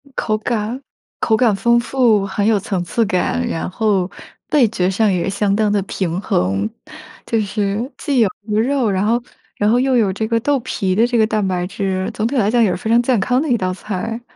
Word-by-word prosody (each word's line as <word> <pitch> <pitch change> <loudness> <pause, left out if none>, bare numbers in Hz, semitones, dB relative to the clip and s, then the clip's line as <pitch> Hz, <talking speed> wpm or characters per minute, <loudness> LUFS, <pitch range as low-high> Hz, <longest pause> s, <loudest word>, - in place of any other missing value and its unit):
口 215 -1 0
感 225 +3 -3 0.4
口 220 - +2
感 225 -2 +3
丰 235 +4 +3
富， 235 -5 +2
很 200 +1 -2
有 220 - +4
层 195 -2 -2
次 225 +6 0
感， 180 - 0
然 165 - -3
后 195 -2 0 0.4
味 285 -5 +6
觉 185 -4 0
上 205 +2 +2
也 180 +1 0
相 200 0 0
当 210 0 +1
地 205 -1 +1
平 185 -2 -3
衡。 95 - 0 0.6
就 225 - 0
是 210 +4 -2
既 280 -4 0
有 220 -4 +4 0.2
鱼 210 - 0
肉， 250 +1 +1
然 195 0 0
后 235 +3 +1 0.4
然 205 - +2
后 240 +3 +3
又 260 0 +2
有 205 -4 +2
这 220 +3 -2
个 230 0 +1
豆 280 +4 +1
皮 190 -4 -2
的 225 +4 +4
这 240 0 0
个 220 -1 +4
蛋 215 -2 0
白 180 -1 -1
质， 190 -1 -2
总 215 - -2
体 260 +5 -1
来 210 -2 +2
讲， 240 0 +3
也 215 - +3
是 175 - -2
非 220 - -5
常 235 +1 +5
健 245 -2 +1
康 250 +6 +1
的 310 - -2
一 240 - +3
道 185 -3 -1
菜。 215 +4 -5
215 Hz, 240 characters per minute, -18 LUFS, 195-235 Hz, 0.6 s, 味